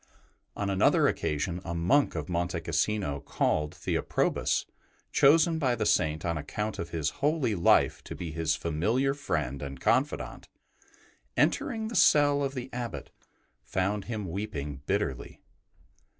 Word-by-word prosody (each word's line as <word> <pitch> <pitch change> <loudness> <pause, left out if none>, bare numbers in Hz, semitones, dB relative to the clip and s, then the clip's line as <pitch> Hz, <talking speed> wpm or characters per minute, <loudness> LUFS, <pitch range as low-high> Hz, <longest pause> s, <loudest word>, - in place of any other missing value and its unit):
On 100 - -2
another 95 - +4
occasion 85 +4 -1
a 85 -1 -4
monk 90 +12 +2
of 80 -1 -3
Monte 85 0 -1
Cassino 85 -1 -1
called 75 +2 -1
Theoprobus, - - 0 0.5
chosen 160 +3 +5
by 130 -5 +2
the 110 -2 -1
Saint 80 -2 +1
on 85 -2 -1
account 105 +8 -4
of 85 - -4
his 80 -4 -1
holy 145 -5 +1
life 85 -4 +3
to - - -7
be 85 -3 -5
his 75 -1 0
familiar 110 - 0
friend 75 - -3
and 70 -2 -6
confidant, 130 - 0 0.9
entering 225 -5 +1
the 230 - -6
cell 145 -1 +5
of 135 0 -2
the 130 0 -6
Abbot, 120 -4 -5 0.5
found 95 +8 -1
him 110 -4 -4
weeping 75 -7 -5
bitterly. 95 -11 -2
95 Hz, 135 wpm, -29 LUFS, 80-130 Hz, 0.9 s, chosen